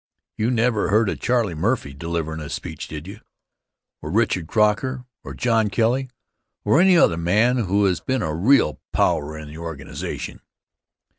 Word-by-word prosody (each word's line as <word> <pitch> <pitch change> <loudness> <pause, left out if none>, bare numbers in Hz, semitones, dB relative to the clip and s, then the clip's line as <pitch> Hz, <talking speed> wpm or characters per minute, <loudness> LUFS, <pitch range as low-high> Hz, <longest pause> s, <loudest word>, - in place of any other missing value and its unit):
You 110 +2 0
never 115 -3 +1
heard 110 +1 +3
of - - -4
Charlie 120 -7 +1
Murphy 85 - -1
delivering 80 +1 -4
a 75 -2 -7
speech, - - -6
did 75 0 -7
you? 100 +3 -9 0.8
Or - - -6
Richard 85 -3 +1
Croker, 115 +6 +1 0.2
or - - -8
John 115 -3 +1
Kelly, 125 +5 +1 0.6
or 155 - +4
any 185 -1 +6
other 85 - +4
man 105 +9 +2
who 100 +2 +2
has 90 -5 +1
been 130 - -1
a 80 - -2
real 85 - +3
power 75 +2 +1
in 80 -1 -8
the 75 +2 -10
organization? 80 -5 -6
100 Hz, 160 wpm, -22 LUFS, 80-120 Hz, 0.8 s, any